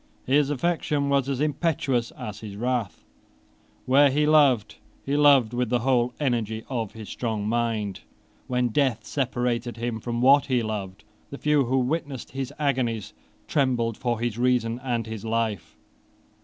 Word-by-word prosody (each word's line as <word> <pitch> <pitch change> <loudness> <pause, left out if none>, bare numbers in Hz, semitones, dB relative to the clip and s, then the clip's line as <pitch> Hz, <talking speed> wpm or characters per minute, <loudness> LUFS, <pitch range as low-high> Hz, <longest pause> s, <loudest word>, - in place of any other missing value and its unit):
His 140 +2 +3
affection 145 -1 0
was 140 -1 +1
as 135 -2 -2
impetuous 140 -5 0
as 105 -1 -6
his 105 -2 -8
wrath. 120 -2 -2 0.8
Where 140 +2 +5
he 150 +3 +1
loved, 140 -8 +3 0.3
he 140 - 0
loved 140 -6 +5
with 125 -1 -1
the 120 -1 +1
whole 125 -1 +1
energy 115 -6 -1
of 115 -6 -3
his 110 -2 -9
strong 110 -4 -3
mind. 110 -4 -1 0.5
When 125 -1 +1
death 120 -4 0
separated 120 -2 -2
him 120 -1 -3
from 120 +1 -3
what 140 +3 +5
he 125 -3 +1
loved, 105 -2 -5 0.3
the 140 - -7
few 150 -2 +2
who 130 +3 +1
witnessed 135 0 -2
his 135 0 -4
agonies 125 -7 -1 0.3
trembled 125 -5 +1
for 120 -2 -2
his 120 -1 -2
reason 125 -1 +1
and 120 -3 -1
his 110 -2 -7
life. 110 -5 -2
125 Hz, 155 wpm, -25 LUFS, 115-135 Hz, 0.8 s, Where